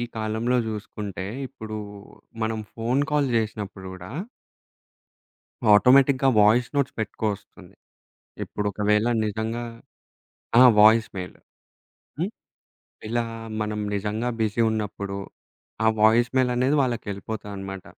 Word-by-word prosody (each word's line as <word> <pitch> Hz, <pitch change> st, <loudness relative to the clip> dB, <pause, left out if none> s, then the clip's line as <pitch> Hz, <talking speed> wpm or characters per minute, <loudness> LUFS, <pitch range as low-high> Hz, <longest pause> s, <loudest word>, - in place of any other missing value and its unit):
కాలంలో 110 Hz, +3 st, 0 dB
జూసుకుంటే 105 Hz, -3 st, -5 dB, 0.2 s
ఇప్పుడు 110 Hz, -5 st, -7 dB, 0.6 s
మనం 110 Hz, 0 st, -1 dB
ఫోను 125 Hz, +5 st, 0 dB
కాల్ 145 Hz, -2 st, +2 dB
జేసినప్పుడు 105 Hz, -3 st, -3 dB
గూడా 90 Hz, 0 st, -10 dB, 1.7 s
ఆటోమేటిక్‌గా 135 Hz, +4 st, +5 dB
వాయిస్ 115 Hz, +4 st, +4 dB
నోట్స్ 140 Hz, -2 st, 0 dB
పెట్టుకొస్తుంది. 105 Hz, -1 st, -5 dB, 0.7 s
ఇప్పుడొకవేళ 105 Hz, +1 st, 0 dB, 0.2 s
నిజంగా 110 Hz, +3 st, -3 dB, 1.0 s
ఆ! -, -, +9 dB, 0.2 s
Voice 110 Hz, +1 st, +6 dB
mail. 90 Hz, -1 st, -7 dB, 0.8 s
హ్మ్. -, -, -1 dB, 0.8 s
ఇలా 120 Hz, +1 st, 0 dB, 0.4 s
మనం 105 Hz, 0 st, -2 dB
నిజంగా 105 Hz, +4 st, -2 dB
బిజి 110 Hz, +1 st, 0 dB
ఉన్నప్పుడు 100 Hz, -2 st, -3 dB, 0.7 s
ఆ -, -, +4 dB
వాయిస్ 115 Hz, +3 st, +5 dB
మెయిల్ 130 Hz, -1 st, +3 dB
అనేది 130 Hz, +4 st, +2 dB
వాళ్ళకెళ్ళిపోతదనమాట. 100 Hz, -4 st, -5 dB
110 Hz, 95 wpm, -24 LUFS, 105-120 Hz, 1.7 s, ఆ